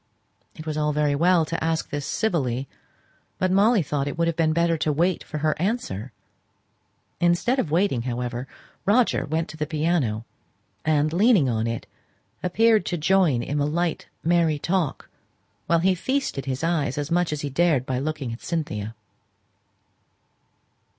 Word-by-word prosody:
It 155 - -9
was 155 -1 -3
all 150 0 +1
very 150 -1 +2
well 170 +2 +3
to 165 +1 -3
ask 160 0 -1
this 145 -1 -3
civilly, 140 - -1 0.7
but 185 0 +1
Molly 205 +1 +4
thought 140 -1 -2
it 145 - -4
would 170 - +2
have 170 - 0
been 160 -1 +2
better 170 +1 +2
to 155 - +1
wait 170 +4 +1
for 155 - -6
her 155 +1 +1
answer. 135 - -2 1.1
Instead 175 +10 +2
of 165 - 0
waiting, 165 -5 +1
however, 125 +1 -3 0.4
Roger 220 +5 +3
went 160 +2 -1
to 160 - -9
the 150 -1 -2
piano, 150 -9 0 0.6
and, 155 0 +2
leaning 200 - +4
on 115 -2 0
it, 115 0 -3 0.6
appeared 220 +3 +3
to 175 - -1
join 155 -6 +3
in 145 +3 -2
the 145 - +1
light 170 +2 -1 0.2
merry 165 -2 +2
talk, 170 0 -1 0.6
while 170 - +4
he 190 +2 +4
feasted 260 - -2
his 135 +2 -3
eyes 155 -6 0
as 145 +2 -3
much 175 -1 +2
as 150 -1 -3
he 145 - -4
dared 155 -4 +2
by 130 -1 -1
looking 140 -4 -3
at 115 - -9
Cynthia. 115 - -3
155 Hz, 165 wpm, -24 LUFS, 140-175 Hz, 1.1 s, Molly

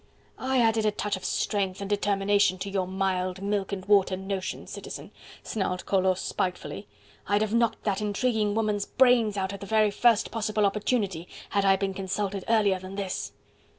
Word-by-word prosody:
"I 260 0 +1
added 225 -2 +3
a - - +3
touch 210 0 -2
of 190 - -9
strength 195 0 -1
and 200 - -4
determination 200 -1 +2
to 195 +1 -5
your 190 -2 -1
mild 185 -1 -1
milk 200 0 -1
and 190 -2 -4
water 195 -2 +3
notions, 190 0 -4
Citizen," - - -8 0.3
snarled 185 -4 -2
Collot 190 -1 +2
spitefully. 180 - -3 0.4
"I'd 205 +2 +2
have 215 0 -2
knocked 235 -1 +1
that 200 -1 0
intriguing 210 0 0
woman's 210 -2 0
brains 245 -5 +4
out 190 0 -1
at 200 - -7
the 200 - -8
very 215 -1 +3
first 230 +1 +3
possible 215 -2 0
opportunity, 200 -4 -1 0.2
had 200 -1 +1
I 195 0 +6
been 195 0 -2
consulted 195 0 -3
earlier 205 -4 +3
than 185 +1 -8
this." 195 -2 -3
200 Hz, 175 wpm, -27 LUFS, 190-210 Hz, 0.4 s, I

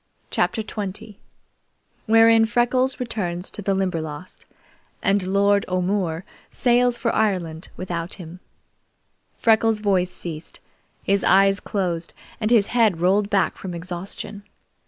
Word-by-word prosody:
CHAPTER 220 - 0
XX 205 -1 -6 0.9
Wherein 225 0 +6
Freckles 255 +3 +1
returns 185 -7 -3
to - - -7
the 195 0 0
Limberlost, 170 -3 -4 0.6
and 200 +1 +3
Lord 200 +1 +3
O'More 185 -1 -1 0.2
Sails 245 -1 +2
for 230 -1 -1
Ireland 180 -6 -1
Without 175 -1 -4
Him 175 -1 -10 1.0
Freckles' 225 -1 +3
voice 190 -4 +1
ceased, 170 -3 -6 0.4
his 200 0 +1
eyes 195 +1 +4
closed, 175 -4 -3 0.3
and 215 -1 0
his 230 -4 +5
head 220 -8 +3
rolled 195 +4 +2
back 200 -2 +1
from 180 -2 -6
exhaustion. 180 +4 -6
195 Hz, 115 wpm, -23 LUFS, 180-220 Hz, 1.0 s, Wherein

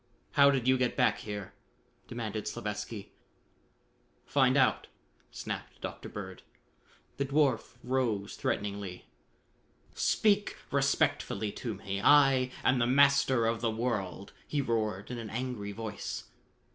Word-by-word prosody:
"How 140 0 +6
did 130 -3 +1
you 130 0 +4
get 125 -2 0
back - - +3
here?" 105 -2 -6 0.5
demanded 110 -3 -4
Slavatsky. 105 0 -5 1.1
"Find 130 -1 +3
out!" 130 - +3 0.4
snapped - - -6
Dr. - - -6
Bird. - - -7 0.8
The 140 - 0
dwarf 140 -3 +1
rose 120 -6 -1
threateningly. 100 -3 -3 0.9
"Speak 205 -1 +2
respectfully 135 -6 +1
to 115 -1 -5
me; 100 +1 -4
I 135 -3 +6
am 130 -1 +3
the 120 - +2
Master 140 -2 +4
of 115 0 0
the 115 - +1
World!" 110 -4 -3
he 150 - -1
roared 110 -5 -1
in 120 - -4
an 110 -2 -6
angry 120 -4 -4
voice. 110 0 -5
120 Hz, 120 wpm, -31 LUFS, 105-130 Hz, 1.1 s, How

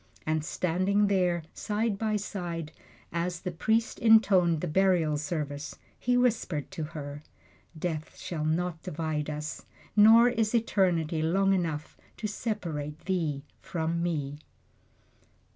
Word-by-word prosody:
And 155 -1 0
standing 185 +5 +1
there, 180 -4 +2
side 210 -1 -1
by 220 -1 0
side, 175 -6 -4 0.4
as 170 0 -2
the 180 - -3
priest 220 +7 0
intoned 195 -8 +5
the 180 - -2
burial 170 -2 +3
service, 150 -2 -3 0.2
he 245 0 +2
whispered 220 - 0
to 175 -5 -4
her, 145 -1 -7 0.6
"Death 155 -2 -4
shall 160 -3 -4
not 165 +1 -1
divide 155 -1 -3
us, 150 0 -5 0.3
nor 225 +3 +8
is 225 -1 0
eternity 175 -8 +1
long 195 +5 +3
enough 160 -5 -2 0.2
to - - -5
separate 170 -9 -3
thee 160 -7 -1 0.2
from 165 0 -2
me!" 145 -4 -2
170 Hz, 125 wpm, -29 LUFS, 155-200 Hz, 0.6 s, nor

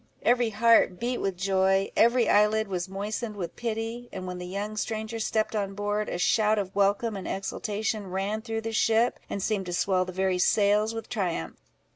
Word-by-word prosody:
Every 240 -1 +3
heart 220 -4 +4
beat 245 +1 -1
with 195 -2 -2
joy, 195 +1 +2
every 235 +1 +4
eyelid 210 +1 +3
was 185 -1 -3
moistened 210 +3 -4
with 175 -4 -5
pity; 230 +1 -4
and 185 -1 -6
when 180 0 -5
the 180 - -6
young 205 +3 -4
stranger 220 +1 -3
stepped 220 0 0
on 200 -2 -2
board, 205 +1 -1
a - - -3
shout 215 +4 +3
of 195 -2 -3
welcome 205 +3 +2
and 195 - -6
exultation 210 +1 -3
ran 195 +4 -2
through 225 -1 -3
the 225 0 -4
ship, 225 +3 +2
and 200 - -3
seemed 200 -4 -1
to 175 - -4
swell 185 0 +1
the 185 - -6
very 190 0 0
sails 210 +3 +3
with 225 - -6
triumph. 180 - -2
210 Hz, 190 wpm, -27 LUFS, 190-225 Hz, -, heart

